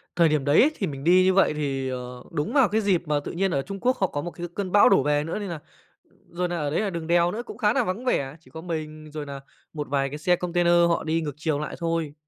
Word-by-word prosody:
Thời 170 Hz, -2 st, +4 dB
điểm 150 Hz, -3 st, 0 dB
đấy 145 Hz, +1 st, +5 dB
ấy, 295 Hz, -, +4 dB
thì 195 Hz, -, -2 dB
mình 135 Hz, -3 st, -6 dB
đi 180 Hz, +3 st, +5 dB
như 190 Hz, 0 st, +4 dB
vậy 195 Hz, -4 st, +4 dB
thì, 135 Hz, -3 st, -2 dB
ờ, 125 Hz, -1 st, -6 dB
đúng 150 Hz, -2 st, -2 dB
vào 270 Hz, -7 st, +4 dB
cái 220 Hz, +2 st, +1 dB
dịp 195 Hz, -5 st, +1 dB
mà 150 Hz, -1 st, +1 dB
tự 145 Hz, -, -6 dB
nhiên 190 Hz, +2 st, 0 dB
ở 140 Hz, -, 0 dB
Trung 195 Hz, +7 st, -7 dB
Quốc 255 Hz, +3 st, +1 dB
họ 190 Hz, -, +1 dB
có 145 Hz, -, -4 dB
một 175 Hz, -, -5 dB
cái 175 Hz, 0 st, -6 dB
cơn 195 Hz, -3 st, -3 dB
bão 205 Hz, -, +6 dB
đổ 195 Hz, -9 st, +4 dB
về 145 Hz, +1 st, +1 dB
nữa, 165 Hz, +6 st, -4 dB
nên 205 Hz, -2 st, -5 dB
là 170 Hz, -3 st, -5 dB, 0.7 s
rồi 180 Hz, +1 st, -2 dB
nà 175 Hz, 0 st, -3 dB
ở 150 Hz, -3 st, -1 dB
đấy 155 Hz, -, 0 dB
là 210 Hz, -, -1 dB
đường 170 Hz, -3 st, -5 dB
đèo 170 Hz, 0 st, +3 dB
nữa 220 Hz, -, -4 dB
cũng 215 Hz, -, -9 dB
khá 215 Hz, -3 st, +2 dB
nà 260 Hz, -, +2 dB
vắng 215 Hz, +4 st, -4 dB
vẻ. 140 Hz, -, 0 dB
Chỉ 160 Hz, -, -22 dB
có 160 Hz, -, -8 dB
mình 155 Hz, -2 st, -6 dB
rồi 150 Hz, -1 st, -5 dB
nà 140 Hz, -1 st, -7 dB, 0.3 s
một 150 Hz, -2 st, -4 dB
vài 135 Hz, 0 st, 0 dB
cái 145 Hz, -, -6 dB
xe 175 Hz, +4 st, +2 dB
container 175 Hz, 0 st, +1 dB, 0.2 s
họ 170 Hz, -, 0 dB
đi 165 Hz, +1 st, 0 dB
ngược 150 Hz, -3 st, -4 dB
chiều 155 Hz, -2 st, -1 dB
lại 150 Hz, -, -5 dB
thôi. 165 Hz, -3 st, -2 dB
165 Hz, 300 wpm, -25 LUFS, 150-185 Hz, 0.7 s, bão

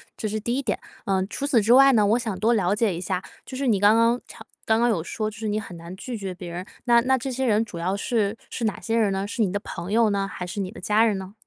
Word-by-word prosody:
这 215 Hz, -, -3 dB
是 215 Hz, +1 st, -2 dB
第 235 Hz, +3 st, -2 dB
一 275 Hz, -, 0 dB
点。 -, -, -2 dB, 0.2 s
呃， 190 Hz, -1 st, 0 dB
除 280 Hz, -, -4 dB
此 255 Hz, -6 st, +3 dB
之 225 Hz, +4 st, +4 dB
外 275 Hz, +1 st, +8 dB
呢， 215 Hz, -5 st, +4 dB
我 220 Hz, +3 st, +3 dB
想 220 Hz, -6 st, -4 dB
多 230 Hz, +2 st, +3 dB
了 195 Hz, -3 st, +2 dB
解 210 Hz, -3 st, +1 dB
一 170 Hz, -, -5 dB
下， 185 Hz, 0 st, -2 dB, 0.2 s
就 260 Hz, -, -7 dB
是 275 Hz, 0 st, -1 dB
你 215 Hz, -5 st, +3 dB
刚 210 Hz, +2 st, +6 dB
刚 230 Hz, +2 st, +3 dB
常 -, -, -13 dB, 0.2 s
刚 220 Hz, 0 st, +3 dB
刚 240 Hz, +1 st, +3 dB
有 175 Hz, -8 st, 0 dB
说 215 Hz, +3 st, -3 dB
就 215 Hz, -, -12 dB
是 220 Hz, -, -4 dB
你 210 Hz, +1 st, 0 dB
很 190 Hz, -4 st, -9 dB
难 170 Hz, +2 st, -9 dB
拒 245 Hz, +3 st, -5 dB
绝 195 Hz, -3 st, -5 dB
别 180 Hz, -1 st, -8 dB
人， 180 Hz, +2 st, -5 dB, 0.2 s
那 235 Hz, -1 st, +5 dB
那 260 Hz, +2 st, +2 dB
这 260 Hz, +2 st, -4 dB
些 265 Hz, +2 st, -2 dB
人 220 Hz, -1 st, +2 dB
主 175 Hz, -, -9 dB
要 185 Hz, +3 st, -1 dB
是 215 Hz, 0 st, 0 dB
是 240 Hz, -, -5 dB
哪 210 Hz, -, -1 dB
些 225 Hz, -, -2 dB
人 215 Hz, -3 st, +2 dB
呢？ 195 Hz, +1 st, -2 dB
是 230 Hz, -, -3 dB
你 200 Hz, -4 st, +2 dB
的 205 Hz, -, -1 dB
朋 175 Hz, -1 st, -7 dB
友 225 Hz, 0 st, +4 dB
呢？ 195 Hz, -1 st, 0 dB
还 180 Hz, -, -5 dB
是 190 Hz, +4 st, -6 dB
你 190 Hz, 0 st, -3 dB
的 -, -, -11 dB
家 215 Hz, +2 st, +3 dB
人 210 Hz, -3 st, +1 dB
呢？ 190 Hz, +1 st, -8 dB
215 Hz, 330 characters per minute, -24 LUFS, 195-235 Hz, 0.2 s, 外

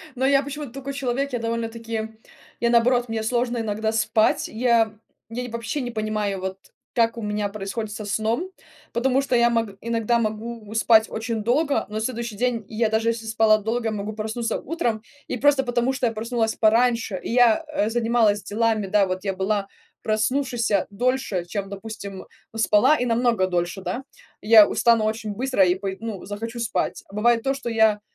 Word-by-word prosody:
Но 260 Hz, +1 st, 0 dB
я 275 Hz, 0 st, +4 dB
почему-то 285 Hz, -2 st, -6 dB
такой 275 Hz, +1 st, -6 dB
человек. 275 Hz, 0 st, -2 dB
Я 245 Hz, -, 0 dB
довольно-таки 230 Hz, -1 st, -3 dB, 0.5 s
я 235 Hz, -, +3 dB
наоборот, 240 Hz, 0 st, +3 dB
мне 220 Hz, -1 st, -2 dB
сложно 240 Hz, +1 st, 0 dB
иногда 220 Hz, -1 st, -1 dB
спать. 220 Hz, 0 st, +2 dB
Я 230 Hz, -1 st, +2 dB, 0.4 s
я 240 Hz, +2 st, -4 dB
ни 245 Hz, -, -5 dB
вообще 235 Hz, +5 st, -3 dB
не 245 Hz, -, -4 dB
понимаю, 215 Hz, -3 st, -2 dB
вот, 190 Hz, +1 st, -5 dB, 0.3 s
как 230 Hz, 0 st, +2 dB
у 230 Hz, -, -4 dB
меня 210 Hz, -1 st, -2 dB
происходит 210 Hz, +2 st, -5 dB
со 210 Hz, 0 st, -6 dB
сном. 225 Hz, -, -1 dB, 0.4 s
Потому 260 Hz, +3 st, +2 dB
что 265 Hz, -2 st, 0 dB
я 235 Hz, 0 st, +5 dB
мог 230 Hz, -2 st, 0 dB
иногда 230 Hz, 0 st, +1 dB
могу 220 Hz, 0 st, -4 dB
спать 225 Hz, -1 st, +5 dB
очень 225 Hz, 0 st, -3 dB
долго, 280 Hz, +6 st, +1 dB
но 210 Hz, -, -8 dB
на 215 Hz, -, -1 dB
следующий 235 Hz, -2 st, -3 dB
день 240 Hz, -3 st, -1 dB
я, 225 Hz, 0 st, 0 dB
даже 220 Hz, +1 st, +1 dB
если 230 Hz, -1 st, -3 dB
спала 220 Hz, -1 st, +4 dB
долго, 225 Hz, +2 st, -2 dB
могу 210 Hz, 0 st, -4 dB
проснуться 220 Hz, +2 st, -3 dB
утром. 240 Hz, -9 st, -2 dB, 0.3 s
И 250 Hz, -, -3 dB
просто 280 Hz, +1 st, +4 dB
потому, 245 Hz, 0 st, 0 dB
что 260 Hz, -1 st, -1 dB
я 230 Hz, -, -2 dB
проснулась 225 Hz, 0 st, -1 dB
пораньше, 230 Hz, -2 st, +2 dB
и -, -, -5 dB
я, 245 Hz, +5 st, +4 dB
э, 295 Hz, -8 st, 0 dB
занималась 225 Hz, -3 st, +2 dB
делами. 220 Hz, 0 st, 0 dB
Да, 200 Hz, 0 st, +3 dB
вот, 185 Hz, +1 st, -3 dB
я 195 Hz, -1 st, -1 dB
была 195 Hz, +1 st, -1 dB, 0.4 s
проснувшейся 225 Hz, -2 st, +1 dB
дольше, 235 Hz, -4 st, -1 dB
чем, 195 Hz, +2 st, -4 dB
допустим, 200 Hz, -1 st, -7 dB, 0.3 s
спала, 225 Hz, +6 st, +4 dB
и 250 Hz, -, -1 dB
намного 230 Hz, -5 st, +2 dB
дольше, 175 Hz, +1 st, -2 dB
да. 245 Hz, +7 st, -4 dB, 0.4 s
Я 215 Hz, -1 st, +8 dB
устану 230 Hz, -1 st, +3 dB
очень 220 Hz, 0 st, -2 dB
быстро 255 Hz, -2 st, +2 dB
и 180 Hz, -, +3 dB
пой 190 Hz, 0 st, -4 dB
ну, 220 Hz, -4 st, -6 dB
захочу 225 Hz, +4 st, -6 dB
спать. 230 Hz, -2 st, -2 dB
А -, -, -16 dB
бывает 230 Hz, +2 st, +3 dB
то, 270 Hz, +3 st, 0 dB
что 270 Hz, -3 st, -5 dB
я, 220 Hz, -2 st, +3 dB
225 Hz, 185 wpm, -23 LUFS, 215-240 Hz, 0.5 s, Я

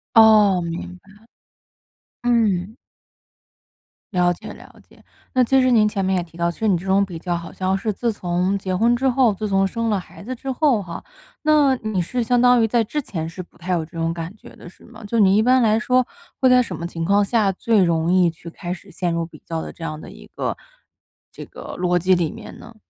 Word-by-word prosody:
哦， 210 Hz, -4 st, +6 dB
明 170 Hz, +2 st, -6 dB
白， 195 Hz, +2 st, -24 dB, 1.1 s
嗯。 220 Hz, -4 st, +1 dB, 1.4 s
了 180 Hz, -1 st, +3 dB
解 -, -, -10 dB
了 -, -, -15 dB, 0.2 s
解， -, -, -22 dB, 0.3 s
那 255 Hz, -1 st, +4 dB
其 265 Hz, +3 st, +3 dB
实 255 Hz, 0 st, +3 dB
您 215 Hz, -3 st, +5 dB
前 200 Hz, -2 st, -2 dB
面 190 Hz, 0 st, +1 dB
也 175 Hz, -, -1 dB
提 165 Hz, 0 st, -16 dB
到， 170 Hz, 0 st, +1 dB
其 -, -, -17 dB
实 220 Hz, -, 0 dB
你 185 Hz, -4 st, +3 dB
这 180 Hz, -, -9 dB
种 195 Hz, +1 st, +3 dB
比 175 Hz, -3 st, -8 dB
较 175 Hz, 0 st, -2 dB
好 170 Hz, 0 st, -6 dB
像 190 Hz, +1 st, -1 dB
是 215 Hz, +2 st, -2 dB
自 230 Hz, +3 st, -1 dB
从 180 Hz, +1 st, -1 dB
结 185 Hz, -1 st, -3 dB
婚 235 Hz, +5 st, +3 dB
之 265 Hz, +2 st, +1 dB
后， 245 Hz, -4 st, +3 dB
自 215 Hz, +2 st, -4 dB
从 195 Hz, 0 st, +2 dB
生 230 Hz, +3 st, -2 dB
了 205 Hz, -3 st, +1 dB
孩 180 Hz, -, -13 dB
子 255 Hz, +3 st, -5 dB
之 265 Hz, +2 st, -5 dB
后 255 Hz, -5 st, +2 dB
哈。 170 Hz, -2 st, -8 dB, 0.4 s
那 300 Hz, -3 st, +4 dB
你 215 Hz, -5 st, -2 dB
是 240 Hz, +7 st, -2 dB
相 245 Hz, +2 st, +2 dB
当 245 Hz, -1 st, +5 dB
于 225 Hz, -, +3 dB
在 230 Hz, +1 st, +2 dB
之 295 Hz, +7 st, -3 dB
前 165 Hz, -10 st, -5 dB
是 175 Hz, +3 st, -7 dB
不 -, -, -25 dB
太 180 Hz, +2 st, -3 dB
有 165 Hz, -2 st, -1 dB
这 -, -, -23 dB
种 165 Hz, 0 st, -1 dB
感 170 Hz, +4 st, -6 dB
觉 -, -, -14 dB
的 -, -, -12 dB
是 -, -, -21 dB
吗？ 225 Hz, -1 st, -14 dB
就 230 Hz, +2 st, -1 dB
你 195 Hz, -1 st, +5 dB
一 215 Hz, -, +4 dB
般 255 Hz, +1 st, +4 dB
来 220 Hz, -1 st, +3 dB
说， 250 Hz, 0 st, +2 dB, 0.3 s
会 260 Hz, -, +4 dB
在 250 Hz, 0 st, +6 dB
什 -, -, -4 dB
么 170 Hz, -, -6 dB
情 165 Hz, -1 st, -5 dB
况 200 Hz, +3 st, +3 dB
下 210 Hz, -2 st, +2 dB
最 210 Hz, +1 st, +2 dB
容 170 Hz, 0 st, +1 dB
易 180 Hz, -2 st, +4 dB
去 170 Hz, +1 st, -11 dB
开 175 Hz, +1 st, -6 dB
始 195 Hz, +2 st, -12 dB
陷 175 Hz, -2 st, -2 dB
入 170 Hz, 0 st, -1 dB
比 165 Hz, -, -15 dB
较 165 Hz, -1 st, -3 dB
的 -, -, -7 dB
这 170 Hz, -, -11 dB
样 155 Hz, -1 st, -5 dB
的 -, -, -11 dB
一 -, -, -14 dB
个 -, -, -2 dB, 0.8 s
这 -, -, -10 dB
个 -, -, -10 dB
逻 180 Hz, 0 st, +1 dB
辑 185 Hz, +2 st, +3 dB
里 170 Hz, -3 st, -1 dB
面 -, -, -11 dB
呢？ 235 Hz, -, -14 dB
195 Hz, 255 characters per minute, -21 LUFS, 175-230 Hz, 1.4 s, 哦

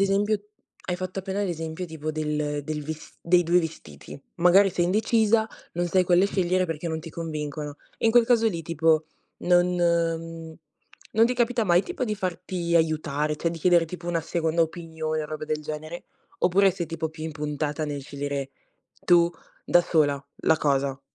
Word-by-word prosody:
esempio 200 Hz, +2 st, +2 dB, 0.5 s
hai 180 Hz, -, 0 dB
fatto 185 Hz, +1 st, -5 dB
appena 195 Hz, +2 st, -3 dB
l'esempio 165 Hz, -1 st, -3 dB
tipo 155 Hz, -1 st, -5 dB
del 150 Hz, -1 st, -2 dB
del 150 Hz, 0 st, -3 dB
ves 160 Hz, +1 st, -8 dB
dei 175 Hz, +1 st, +4 dB
2 175 Hz, +2 st, +4 dB
vestiti: 140 Hz, -, -8 dB, 0.2 s
magari 180 Hz, +3 st, +5 dB
sei 175 Hz, -1 st, 0 dB
indecisa, 220 Hz, +3 st, +2 dB, 0.3 s
non 175 Hz, +1 st, 0 dB
sai 185 Hz, +2 st, +3 dB
quelle 180 Hz, +2 st, +4 dB
scegliere 185 Hz, -2 st, +1 dB
perché 165 Hz, 0 st, -4 dB
non 160 Hz, -1 st, -2 dB
ti 165 Hz, -, -9 dB
convincono. 150 Hz, -2 st, -5 dB, 0.2 s
E -, -, +1 dB
in 225 Hz, -, +5 dB
quel 240 Hz, -1 st, +6 dB
caso 230 Hz, -2 st, +4 dB
lì 170 Hz, -5 st, -4 dB
tipo 160 Hz, -1 st, +2 dB, 0.3 s
non 175 Hz, 0 st, +4 dB
mhmm, 165 Hz, -1 st, -1 dB, 0.6 s
non 225 Hz, +2 st, +5 dB
ti 250 Hz, -, -1 dB
capita 240 Hz, -1 st, +1 dB
mai 175 Hz, -1 st, +4 dB
tipo 360 Hz, -, -3 dB
di 215 Hz, -3 st, -2 dB
farti 180 Hz, -3 st, -3 dB
aiutare, 155 Hz, -2 st, 0 dB
cioè 170 Hz, +2 st, -1 dB
di 165 Hz, -, -6 dB
chiedere 175 Hz, 0 st, +4 dB
tipo 175 Hz, +1 st, -7 dB
una 170 Hz, -1 st, 0 dB
seconda 165 Hz, 0 st, 0 dB
opinione 160 Hz, -1 st, -3 dB
o -, -, -5 dB
robe 155 Hz, 0 st, -5 dB
del 155 Hz, 0 st, -2 dB
genere, 155 Hz, +3 st, -6 dB, 0.3 s
oppure 195 Hz, +2 st, +4 dB
sei 175 Hz, -2 st, -4 dB
tipo 160 Hz, 0 st, -3 dB
più 160 Hz, 0 st, -10 dB
impuntata 150 Hz, -1 st, -3 dB
nel 145 Hz, -2 st, -4 dB
scegliere 140 Hz, -1 st, -4 dB, 0.5 s
tu 170 Hz, -1 st, +5 dB, 0.3 s
da 175 Hz, -, +5 dB
sola 145 Hz, -5 st, +1 dB, 0.2 s
la 160 Hz, -, +4 dB
cosa? 140 Hz, -2 st, 0 dB
165 Hz, 175 wpm, -25 LUFS, 155-180 Hz, 0.6 s, quel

